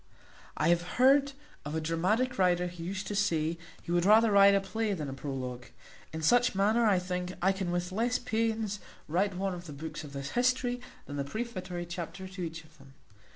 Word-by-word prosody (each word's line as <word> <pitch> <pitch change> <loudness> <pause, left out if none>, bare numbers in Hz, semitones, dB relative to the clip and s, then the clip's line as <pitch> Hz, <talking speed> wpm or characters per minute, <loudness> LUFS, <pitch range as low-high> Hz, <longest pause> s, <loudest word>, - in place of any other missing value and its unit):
I - - +2
have 170 0 +4 0.2
heard 275 +2 +5 0.3
of 150 +2 -5
a - - +1
dramatic 185 +10 0
writer 180 -1 +3
who 175 -1 -7
used 190 +3 -4
to 205 - -4
say, 165 -5 +1 0.2
he - - -6
would 175 0 +2
rather 215 +3 +6
write 200 0 +7
a - - +4
play 220 +2 -2
than 155 -6 -4
a - - -5
prologue; 130 -3 -5 0.4
in 160 0 -5
like 245 -3 +3
manner, 215 +4 +3
I 200 -3 +4
think, 180 0 -3
I 190 +2 +3
can 190 -2 -3
with 175 +1 -2
less 235 +5 +1
pains 225 -3 -1 0.3
write 185 +5 +1
one 195 +1 -1
of 175 0 -8
the 150 - -7
books 155 +2 -6
of 145 -2 -10
this 140 0 -5
history 245 0 +1 0.2
than 145 - -6
the 140 - 0
prefatory 185 - -5
chapter 175 +2 -6
to 185 0 -8
each 165 -1 -5
of 155 0 -22
them. 135 0 -17
185 Hz, 205 wpm, -30 LUFS, 165-215 Hz, 0.4 s, write